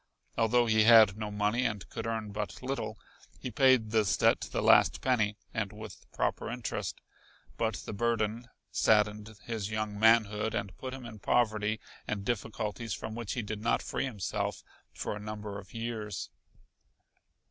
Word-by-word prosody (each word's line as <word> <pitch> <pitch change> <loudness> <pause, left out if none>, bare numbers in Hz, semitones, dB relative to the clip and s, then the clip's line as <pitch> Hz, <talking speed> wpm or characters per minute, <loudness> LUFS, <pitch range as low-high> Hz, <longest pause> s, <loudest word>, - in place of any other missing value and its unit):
Although 120 +1 +3
he 110 -1 +4
had 110 -4 +8
no 105 -1 -4
money 105 +4 +1
and 105 -5 -2
could - - -4
earn 110 -2 -3
but 105 +4 -5
little, 135 +2 -3 0.4
he 125 - -5
paid 125 -2 +4
this 110 -5 +2
debt - - +4
to - - -5
the - - -1
last - - +6
penny 110 -5 +1 0.2
and 110 -4 -2
with 110 0 -11
proper - - -1
interest, - - -4 0.6
but - - 0
the - - -6
burden 115 +1 0 0.2
saddened 105 0 +2
his 110 -3 -3
young 110 -1 -3
manhood 110 -1 +4
and 100 -6 -3
put 130 0 -5
him 130 -2 -9
in 110 -2 -9
poverty 110 -1 +1 0.3
and 100 -2 -3
difficulties 110 -1 -2
from 110 - -6
which 115 -2 -4
he 125 - -2
did 105 0 -5
not 115 - +1
free - - -2
himself 105 -8 -3 0.3
for - - -4
a - - -6
number 105 -1 -6
of 95 - -14
years. 115 -4 -4
110 Hz, 165 wpm, -31 LUFS, 105-115 Hz, 0.6 s, had